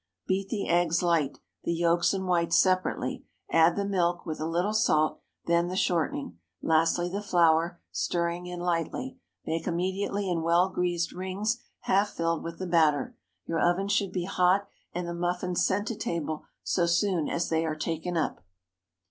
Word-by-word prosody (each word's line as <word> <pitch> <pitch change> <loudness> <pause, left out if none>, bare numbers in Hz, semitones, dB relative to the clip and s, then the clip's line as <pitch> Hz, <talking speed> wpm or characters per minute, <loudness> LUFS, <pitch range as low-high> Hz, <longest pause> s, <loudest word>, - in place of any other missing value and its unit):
Beat 195 +1 -1
the 210 -3 -2
eggs 170 0 +2
light—the 170 0 -1
yolks 170 0 +3
and 190 -1 -2
whites 170 -2 +2
separately; 185 -1 +1 0.3
add 165 +1 +5
the 200 - -1
milk, 175 -3 0
with 155 - -4
a 155 - -2
little 175 +5 0
salt, 155 -9 +2 0.2
then 170 +1 +2
the 180 - -4
shortening, 160 - -1 0.2
lastly 165 +2 +2
the 195 +3 -3
flour, 170 -3 +3
stirring 170 +1 -1
in 180 0 -6
lightly. 180 +10 -2 0.3
Bake 160 0 -2
immediately 190 +3 -1
in 175 -3 0
well 170 +3 +3
greased 175 -2 -1
rings 195 +6 -2 0.2
half 200 +2 +2
filled 165 -3 -1
with 165 0 -6
the 185 - -4
batter. 160 -5 +2 0.3
Your 165 -1 -1
oven 175 +4 +2
should 200 -2 +1
be 180 -2 -2
hot, 185 +1 +2 0.3
and 175 0 -4
the 170 - -3
muffins 175 +1 -1
sent 205 +3 +1
to 230 - -2
table 160 -5 -3 0.2
so 175 -2 +1
soon 175 -2 +1
as 170 - -1
they 160 0 +1
are 155 -1 -1
taken 165 +2 -3
up. 155 - -2
175 Hz, 165 wpm, -28 LUFS, 165-185 Hz, 0.3 s, add